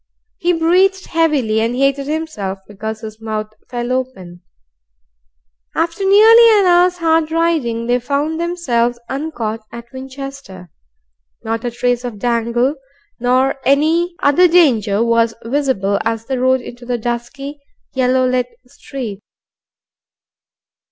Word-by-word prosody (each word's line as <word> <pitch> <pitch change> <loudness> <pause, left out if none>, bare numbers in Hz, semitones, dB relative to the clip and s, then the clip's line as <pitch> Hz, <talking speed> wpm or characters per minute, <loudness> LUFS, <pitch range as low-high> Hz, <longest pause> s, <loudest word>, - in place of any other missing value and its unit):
He 350 - +1
breathed 365 +3 +2
heavily, 290 -10 +1
and 230 +2 -1
hated 275 +1 +1
himself 300 -12 -3
because 215 +2 -6
his 220 0 -9
mouth 215 -1 -4 0.2
fell 240 0 -3
open, 220 -10 -4 1.3
After 335 +3 -1
nearly 440 +3 +7
an 395 - +3
hour's 355 0 +4
hard 325 -2 +1
riding, 315 -9 0
they 245 +1 +1
found 285 +5 -2
themselves 245 -9 0
uncaught 265 -6 -3
at 235 +1 -11
Winchester. 260 - -9 0.7
Not 225 0 -3
a - - 0
trace 245 +1 -1
of 240 -4 -5
Dangle 240 +5 0 0.4
nor 255 +3 +1
any 325 +5 +2
other 290 +6 +5
danger 230 - +3
was 230 -1 +2
visible 230 -7 0
as 225 0 -2
they 265 - -2
rode 260 0 +2
into 245 0 -11
the 245 0 -2
dusky, 240 +5 -5 0.3
yellow 255 -1 +2
lit 250 -1 0 0.2
street. 245 -5 -7
255 Hz, 125 wpm, -17 LUFS, 230-320 Hz, 1.3 s, nearly